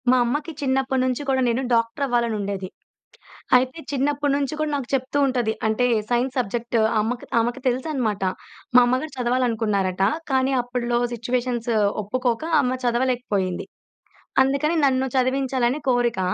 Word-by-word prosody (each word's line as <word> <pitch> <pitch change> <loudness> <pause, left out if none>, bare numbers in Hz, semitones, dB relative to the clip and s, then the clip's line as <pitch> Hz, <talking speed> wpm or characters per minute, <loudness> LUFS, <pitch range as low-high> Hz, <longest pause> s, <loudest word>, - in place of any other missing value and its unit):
మా 255 - +5
అమ్మకి 290 +6 -2
చిన్నప్పట్నుంచి 260 -1 0
కూడా 265 -1 +2
నేను 240 +2 +1
డాక్టర‌వ్వాలనుండేది. 230 -5 0 0.9
అయితే 255 +4 0
చిన్నప్పట్నుంచి 285 0 0
కూడా 310 0 0
నాకు 275 -4 -3
చెప్తూ 265 +2 -1
ఉంటది. 245 -4 0
అంటే 220 +3 +1 0.3
సైన్స్ 245 +2 +1
సబ్జెక్ట్ 235 +1 -2 0.2
అమ్మకు 240 +3 -3
ఆమెకు 240 +3 -1
తెలుసనమాట. 250 -5 -1 0.5
మా - - +10
అమ్మగారు 255 +5 -1
చదవాలనుకున్నారట. 225 -7 0 0.3
కానీ 265 0 +2
అప్పట్లో 245 -1 -1
సిట్యుయేషన్సు 240 0 -1 0.3
ఒప్పుకోక 245 +5 -1 0.2
అమ్మ 255 -1 -1
చదవలేకపోయింది. 240 -7 0 0.8
అందుకని 280 +5 +1
నన్ను 265 -1 +2
చదివించాలని 260 0 +1
కోరిక. 240 -3 +1
250 Hz, 115 wpm, -23 LUFS, 235-265 Hz, 0.9 s, మా